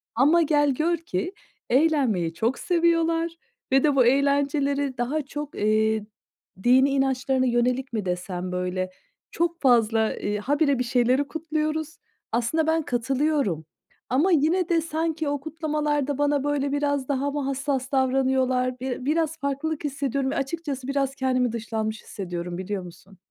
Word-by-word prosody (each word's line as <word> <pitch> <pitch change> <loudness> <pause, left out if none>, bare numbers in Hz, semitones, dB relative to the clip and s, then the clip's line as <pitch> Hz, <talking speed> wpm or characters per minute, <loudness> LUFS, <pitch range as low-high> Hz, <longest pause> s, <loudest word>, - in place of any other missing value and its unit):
Ama 295 +8 +5
gel 290 -2 +3
gör 335 +6 +1
ki 325 - -4 0.4
eğlenmeyi 255 - +2
çok 225 +9 -1
seviyorlar 335 -1 +2 0.4
ve 270 0 +4
de 295 -2 +3
bu 255 -3 +5
eğlenceleri 280 +1 +1
daha 255 +6 -1
çok, 290 +1 -7
eee, 215 0 +1 0.6
dinî 260 +3 +5
inançlarına 265 -1 +1
yönelik 250 +1 0
mi 215 -4 -2
desem, 180 0 -3
böyle, 180 +1 -2 0.4
çok 340 0 -1
fazla, 225 -4 +3
iii, 205 0 -2
habire 280 +3 +1
bir - - +2
şeyleri 250 +3 +2
kutluyoruz. 310 0 -3 0.3
Aslında 245 +8 0
ben 320 0 +2
katılıyorum. 255 - 0 0.4
Ama 295 +10 +3
yine 330 +3 +2
de 335 -1 +3
sanki 320 0 -2
o 285 0 -1
kutlamalarda 295 -2 -1
bana, 290 -1 +1
böyle, 285 -1 0
biraz 285 -2 0
daha 280 0 0
mı 290 - -2
hassas 275 -1 -2
davranıyorlar? 260 -1 +1
Bir 255 0 -4
biraz 320 +2 0
farklılık 280 +2 -2
hissediyorum 275 -1 -1
ve - - -3
açıkçası 275 -2 -3
biraz 275 -1 -1
kendimi 255 -2 +1
dışlanmış 220 -1 -3
hissediyorum, 175 -2 -5
biliyor 190 +1 -4
musun? 185 +2 -14
275 Hz, 140 wpm, -25 LUFS, 240-300 Hz, 0.6 s, Ama